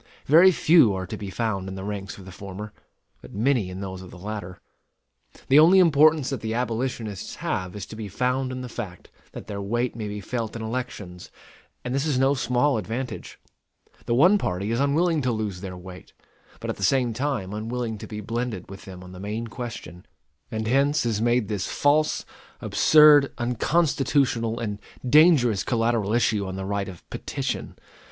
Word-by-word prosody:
Very 170 +6 +7
few 155 - +5
are 95 0 -3
to - - -6
be 100 - -6
found 95 -1 -2
in 95 - -6
the 95 - -6
ranks 100 -1 -5
of 95 - -12
the 95 - -10
former; 100 +2 -8 0.5
but - - -12
many 115 -3 +1
in 90 +1 -7
those 95 -1 -6
of 95 - -11
the 90 - -12
latter. 95 -2 -6 0.9
The 135 +3 +6
only 170 +5 +7
importance 155 -4 +5
that 135 -5 -3
the 110 0 -3
abolitionists 115 -4 -3
have 90 0 -3
is 100 -2 -5
to 110 - -10
be 110 -1 -6
found 125 +5 -1
in 130 0 -5
the 125 - -6
fact 105 -7 -8 0.2
that - - -8
their 100 -2 -5
weight 120 +5 -1
may 110 -2 -4
be 105 0 -5
felt 115 +2 -4
in 115 - -5
elections; 110 -7 -5 0.6
and 125 - -2
this 140 +3 0
is 145 -4 +1
no 135 +2 +3
small 125 0 +1
advantage. 120 +5 -5 0.7
The 120 - +2
one 180 +10 +5
party 100 - -2
is 115 - 0
unwilling 155 +3 +2
to 125 -2 0
lose 105 -5 -3
their 95 -2 -6
weight, 90 0 -12 0.5
but - - -3
at - - -8
the - - -6
same 125 -4 +2
time 120 -6 -2
unwilling 110 +1 -3
to - - -8
be 105 -1 -6
blended 115 -4 -4
with 95 - -10
them 90 -1 -10
on 90 - -11
the 90 - -10
main 105 +4 -4
question; 115 -8 -8 0.4
and 110 0 -3
hence 140 +4 +2
is 110 -2 0
made 120 -1 +2
this 105 -2 -2
false, 150 +2 +1 0.3
absurd, 150 -2 +6
unconstitutional, 125 -2 +1
and 105 -3 -4 0.3
dangerous 130 - +5
collateral 115 -3 0
issue 110 -4 +1
on 95 - -5
the 95 0 -4
right 100 0 -2
of 90 -3 -12
petition. - - -4
115 Hz, 190 wpm, -25 LUFS, 100-130 Hz, 0.9 s, Very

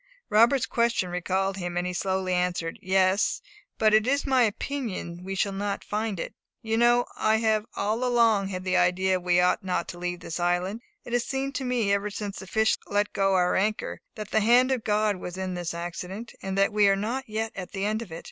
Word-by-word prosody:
Robert's 230 +4 +5
question 235 -6 0
recalled 190 +2 -1
him, 175 -2 -4
and 175 - 0
he 180 - -2
slowly 190 0 -1
answered, 180 -2 -1
"Yes; 190 +1 +2 0.4
but 215 -1 +3
it 215 +2 +4
is 280 +2 +1
my 265 -2 +3
opinion 215 -7 -2
we 195 +1 -4
shall 200 +1 0
not 200 +1 -3
find 210 -2 -2
it. - - -5 0.3
You 225 0 -1
know 240 +1 +4
I 215 0 +3
have 220 -1 +1
all 215 +4 -1
along 230 -5 +3
had 185 -1 -5
the 185 0 0
idea 185 +1 +3
that - - -8
we 175 0 +3
ought 180 +3 +2
not 180 -2 -1
to 175 - -7
leave 175 0 -3
this 165 -1 -5
island. 180 +5 0 0.2
It 240 - -7
has 245 -1 +1
seemed 270 0 -2
to 280 - -3
me, 235 -5 +1
ever 200 +1 0
since 205 -1 -5
the 190 - -9
fish 220 +3 +2
let 205 0 0
go 195 -1 +2
our 180 -1 +2
anchor, 215 +3 -1
that 215 -1 -7
the - - +3
hand 245 +4 +4
of 255 -4 0
God 210 -1 +1
was 180 0 -7
in 190 -1 -3
this 175 -2 -3
accident, 180 +6 -6
and 195 0 -3
that 195 +2 +3
we 210 -1 +5
are 195 - +4
not 230 +6 -3
yet 220 +1 -2
at 180 -2 -6
the 195 0 -2
end 215 +2 0
of 215 -7 -9
it. 165 - -6
200 Hz, 225 wpm, -26 LUFS, 185-225 Hz, 0.4 s, Robert's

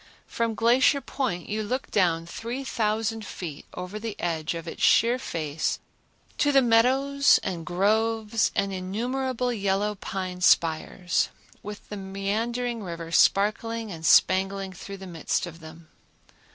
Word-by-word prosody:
From 230 -1 -2
Glacier 245 +5 +4
Point 245 -11 -3
you 215 +1 -2
look 250 +5 -3
down 170 -4 +2
3000 225 0 -2
feet 165 -7 -7
over 180 +4 -6
the 220 -1 -6
edge 165 -1 -2
of 165 0 -7
its - - -7
sheer 240 +3 +4
face 155 - -2 0.6
to 290 - +3
the 270 -2 +5
meadows 265 +5 +4
and 170 -4 -4
groves 215 +3 +1
and 195 0 0
innumerable 245 +6 -2
yellow 200 0 0
pine 185 -2 -5
spires, 170 +1 +2 0.3
with 210 0 -9
the 210 - -5
meandering 220 +5 -2
river 170 -3 -6
sparkling 215 +4 +2
and 160 -2 -8
spangling 190 +4 +3
through 195 +2 -8
the 190 - -10
midst 170 -2 -2
of 170 -1 -10
them. 160 0 -13
205 Hz, 135 wpm, -26 LUFS, 180-230 Hz, 0.6 s, the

